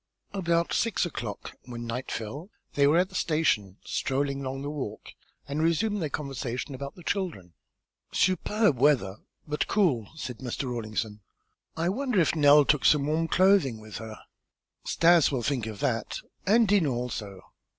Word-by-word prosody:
About 170 -3 0
six 230 -5 +1
o'clock, 120 -10 -6
when 120 -1 -7
night 120 +3 -4
fell, 135 - -5 0.2
they 140 -1 +4
were 155 +3 +4
at 185 +1 +2
the - - -18
station, 145 - 0
strolling 140 +1 -1
along 135 +1 -4
the 145 - -3
walk, 130 -8 -6 0.4
and 145 +2 -2
resumed 200 +6 +1
their 155 - -1
conversation 135 -1 -4
about 140 +1 -6
the 175 - -13
children. 160 - -3 0.6
"Superb 185 - +2
weather, 125 -9 +3 0.3
but 150 0 -1
cool," 150 - +1
said 125 -6 -6
Mr. 130 +1 -4
Rawlinson. 110 -3 -3 0.6
"I 165 +2 +1
wonder 250 0 0
if 165 - +2
Nell 145 -1 +6
took 150 -1 +2
some 145 -2 +4
warm 160 +2 0
clothing 185 - +3
with 110 -1 -9
her." 110 -1 -8 0.7
"Stas 170 -2 +4
will 130 -4 -1
think 125 -3 -1
of 110 -2 -7
that, 120 -5 -1 0.3
and 225 +3 +5
Dinah 195 -7 +3
also." 110 -6 -4
140 Hz, 160 wpm, -27 LUFS, 120-170 Hz, 0.7 s, Nell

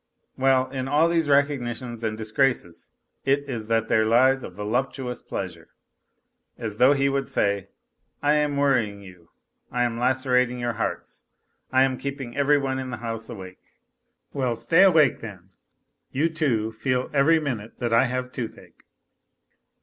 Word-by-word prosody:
Well, 130 -1 +3
in 130 -1 -3
all 150 +4 +3
these 165 -3 +1
recognitions 125 -5 0
and 110 -1 -2
1 110 - -5
i>_ 110 - -11
r - - +7
races 105 -10 -4 0.3
it 140 +1 +1
is 115 -5 -5
that 115 -1 +1
there 110 - +3
lies 130 +4 +4
a - - -7
voluptuous 125 +6 -3
pleasure. 85 -4 -6 0.9
As 110 -2 -5
though 130 +4 +6
he 140 -1 +1
would 135 -1 -1
say: 100 -1 0 0.3
" - - -42
I 145 +1 +4
am 150 -1 +1
worrying 120 -8 +1
you, 90 -3 -15 0.4
I 125 0 +1
am 115 -1 -1
lacerating 125 -1 +1
your 120 -1 -2
hearts, - - -5 0.5
I 130 0 +5
am 130 -1 0
keeping 135 -3 -5
every 145 +1 +3
one 135 -1 -2
in 130 -1 -5
the 120 - -5
house 115 0 -6
awake. 95 -5 -9 0.7
Well, 130 -4 -1
stay 165 +9 +3
awake 160 -9 +5
then, 95 -4 -10 0.6
you, 150 +5 +1
too, 130 -9 0
feel 125 +3 -1
every 150 +3 +4
minute 115 -8 -5
that 120 -2 -2
I 115 +3 +5
have 125 0 -3
toothache. 120 -3 -8
125 Hz, 165 wpm, -24 LUFS, 115-140 Hz, 0.9 s, r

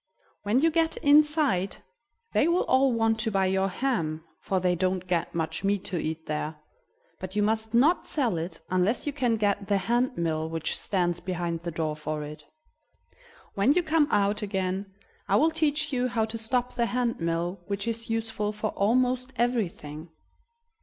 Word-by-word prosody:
"When 215 +6 +2
you 330 +1 +4
get 325 0 +1
inside 290 - +4 0.6
they 305 - +3
will 345 +2 +3
all 265 0 +3
want 225 -1 +1
to 220 0 0
buy 195 -1 +2
your 190 +1 +1
ham, 180 -8 -1 0.2
for 190 - -1
they 180 0 +2
don't 185 +1 0
get 175 -3 -1
much 160 +2 -2
meat 200 -1 0
to 180 -4 -2
eat 160 +1 -4
there; 150 +1 -3 0.6
but 185 +1 -7
you 210 - +2
must 220 +1 0
not 300 +9 +4
sell 240 - 0
it 170 +3 -5
unless 185 +6 +1
you 290 - -2
can 245 -5 +1
get 200 -1 0
the 200 -1 +2
hand 240 +5 0
mill 160 -1 -1
which 165 -1 -2
stands 175 -3 -1
behind 175 -2 -3
the 170 - -4
door 155 -2 -2
for 150 0 -4
it. 150 +1 -9 1.1
When 205 +8 +3
you 355 +2 +2
come 315 -2 +3
out 205 -2 +2
again 195 -1 -2 0.4
I - - +3
will 320 +2 +4
teach 300 -2 0
you 250 0 +1
how 230 -3 0
to 220 +1 -7
stop 245 +2 -1
the 235 -1 +1
hand 245 -1 -1
mill, 170 +2 -1
which 200 +2 -3
is 230 0 -3
useful 220 -2 -1
for 210 0 -2
almost 250 +4 +1
everything." 180 -10 -2
205 Hz, 180 wpm, -27 LUFS, 175-250 Hz, 1.1 s, you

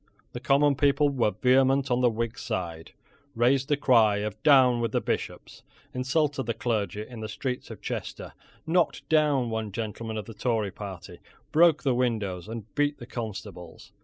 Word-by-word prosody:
The - - -6
common 140 +1 +3
people 145 +1 +3
were 130 -6 +1
vehement 130 +5 +2
on 125 +1 +2
the 125 - +4
Whig 115 +1 -3
side, 85 -7 -5 0.4
raised 130 +3 +2
the 145 -2 +1
cry 115 -7 +4
of 105 0 -4
"Down 130 -5 +5
with 115 -2 -2
the - - +2
Bishops," - - -4 0.3
insulted 135 +1 0
the 115 - -1
clergy 105 -3 -2
in 120 -3 -10
the 110 -1 -5
streets 125 +4 -4
of - - -10
Chester, - - -5 0.3
knocked 170 +2 0
down 145 -6 +2
one 110 -2 -3
gentleman 110 +1 -5
of 105 - -5
the 115 - -9
Tory 110 -2 -1
party, 95 -3 -9 0.3
broke 165 -1 +4
the 135 -3 +2
windows 105 -7 -1
and 115 -1 -8
beat 145 0 0
the 120 - -10
constables. 100 -8 -8
120 Hz, 170 wpm, -27 LUFS, 105-135 Hz, 0.4 s, Down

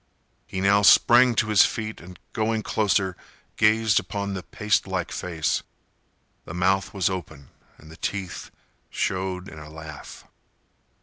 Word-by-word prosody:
He 95 - -4
now 100 +1 +4
sprang 120 +4 +6
to 110 - +1
his 105 -2 +6
feet 110 -1 -3
and, 90 +1 -12 0.2
going 110 -1 -1
closer, 100 -4 +1 0.4
gazed 110 0 +3
upon 100 +1 -4
the 95 - -4
pastelike 95 -3 -1
face. 80 -4 -2 0.8
The 80 - -8
mouth 95 +2 +1
was 95 -4 0
open 80 -7 -5 0.3
and 80 - -15
the 80 - -13
teeth 95 -2 -4 0.4
showed 95 0 -2
in 80 - -10
a 75 0 -11
laugh. 80 -1 -10
95 Hz, 135 wpm, -24 LUFS, 90-105 Hz, 0.8 s, sprang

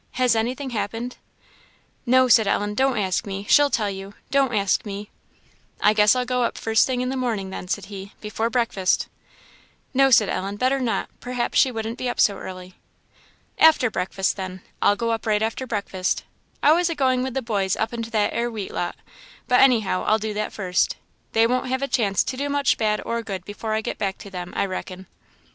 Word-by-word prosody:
Has 250 -3 +2
anything 255 +4 -2
happened?" 225 +3 -4 0.9
"No," 255 +1 +5
said 220 -3 +5
Ellen; 205 +1 0
"don't 265 +2 +1
ask 195 +2 -1
me 195 0 -5
she'll 290 -1 +5
tell 220 -6 0
you 195 +1 -8 0.2
don't 275 -2 +3
ask 200 -4 +1
me." 205 0 -7 0.7
"I 210 - +4
guess 210 +2 +5
I'll 250 0 0
go 250 0 0
up 235 - 0
the - - -9
first 220 -1 +3
thing 255 -1 -1
in 255 - -1
the 265 - -2
morning 225 -7 -2
then," 185 - -6
said 200 +1 -2
he 195 0 -9
"before 220 +2 -2
breakfast." 225 -6 0 0.8
"No," 270 0 +5
said 220 -5 +5
Ellen 195 +2 -3
"better 255 +5 +1
not; 245 -3 -1
perhaps 245 -1 -1
she 265 - +4
wouldn't 225 +1 -4
be 255 - -1
up - - -4
so 200 -2 +4
early." 185 -1 -8 0.9
"After 305 -7 +5
breakfast, 190 +1 -1
then; 185 -1 -6 0.2
I'll 205 - +4
go 230 +2 -1
up 225 0 -3
right 215 0 +2
after 225 +4 -2
breakfast. 195 -4 -2 0.4
I 295 - +6
was 345 +2 +3
a 335 - -2
going 260 -3 +2
with 260 0 -3
the 265 - -1
boys 200 -5 0
up 220 - -2
into 230 -1 -4
that 215 -2 +1
'ere 235 +1 0
wheat 215 -4 -6
lot, 175 - -2 0.5
but 250 - +4
anyhow 225 -8 +3
I'll 215 - +4
do 215 0 -4
that 210 0 -2
first. 185 -3 0 0.4
They 225 0 +4
won't 250 +2 0
have 260 +1 -1
a - - 0
chance 205 -8 +1
to - - -4
do 285 +2 -2
much 285 -1 +2
bad 215 -1 +1
or 235 0 -1
good 195 -5 -6
before 215 +1 -4
I 220 - 0
get - - -5
back 195 -2 -2
to 200 - -11
them, 180 -1 -6
I - - +2
reckon." 185 0 -6
220 Hz, 210 wpm, -23 LUFS, 200-250 Hz, 0.9 s, I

